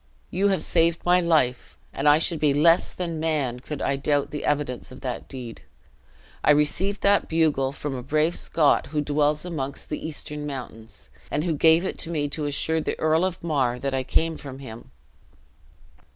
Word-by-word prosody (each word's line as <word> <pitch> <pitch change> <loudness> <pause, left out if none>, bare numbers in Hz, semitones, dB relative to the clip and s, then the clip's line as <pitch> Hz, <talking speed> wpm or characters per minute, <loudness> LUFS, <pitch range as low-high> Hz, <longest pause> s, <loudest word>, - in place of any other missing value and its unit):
You 195 +3 +2
have 195 -2 +1
saved 170 0 +1
my 180 +1 +4
life, 155 -7 +1 0.2
and 150 - +2
I 145 - +7
should 165 0 +1
be 145 -2 +2
less 165 +4 +4
than 170 -3 -4
man 150 -6 -1
could 150 +3 -6
I 140 - 0
doubt 145 +1 0
the 150 - -5
evidence 145 -5 -2
of 130 - -11
that 125 -2 -5
deed. 125 -4 -8 0.8
I - - +2
received 150 +7 +2
that 200 0 +3
bugle 155 -5 +2
from 145 0 -5
a 125 - -4
brave 155 +6 +1
Scot 155 -3 +2
who 150 0 -1
dwells 150 +2 +1
amongst 140 -6 -5
the 150 - -4
eastern 150 -1 -3
mountains; 120 -5 -7 0.2
and 150 - -1
who 170 -2 0
gave 160 +4 +4
it - - -4
to 165 - -2
me 150 -3 -1
to 150 +1 -3
assure 160 +3 0
the - - -3
Earl 160 +2 +2
of 185 -2 -2
Mar 135 -7 0
that 135 +2 -3
I 135 - 0
came 160 +5 0
from 135 -2 -9
him." 120 -4 -10
150 Hz, 190 wpm, -25 LUFS, 135-165 Hz, 0.8 s, I